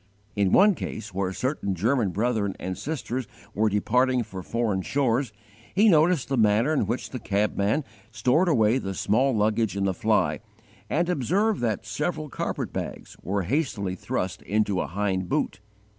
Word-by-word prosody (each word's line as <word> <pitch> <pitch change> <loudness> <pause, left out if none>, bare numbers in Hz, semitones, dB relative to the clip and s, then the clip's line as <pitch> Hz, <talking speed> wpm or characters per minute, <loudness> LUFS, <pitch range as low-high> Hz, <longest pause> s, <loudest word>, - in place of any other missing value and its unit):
In 100 -3 +2
one 205 +2 +6
case 110 - -6
where 95 0 -1
certain 100 -3 -2
German 110 +3 +1
brethren 105 0 0
and 95 0 -4
sisters 130 -4 -4 0.3
were 110 +1 +2
departing 125 +5 +2
for 95 -4 -8
foreign 110 -1 -1
shores, 130 +1 0 0.4
he 210 +4 +5
noticed 160 -3 +4
the 135 - -1
manner 110 +7 +3
in 125 -9 +1
which 120 +4 -3
the 125 - -4
cabman 105 +6 0 0.3
stored 125 - +2
away 120 -5 +3
the 95 -5 -4
small 125 +9 +2
luggage 110 -1 +1
in 100 - 0
the 95 -1 +1
fly; 110 +4 +1 0.5
and 170 +2 +1
observed 180 - +1
that 110 -2 -1
several 150 +7 -3
carpetbags - - -4
were 100 +1 -1
hastily 105 - -1
thrust 95 - -3
into 105 -1 0
a - - -3
hind 95 -1 -1
boot. 90 - -1
110 Hz, 160 wpm, -26 LUFS, 100-135 Hz, 0.5 s, one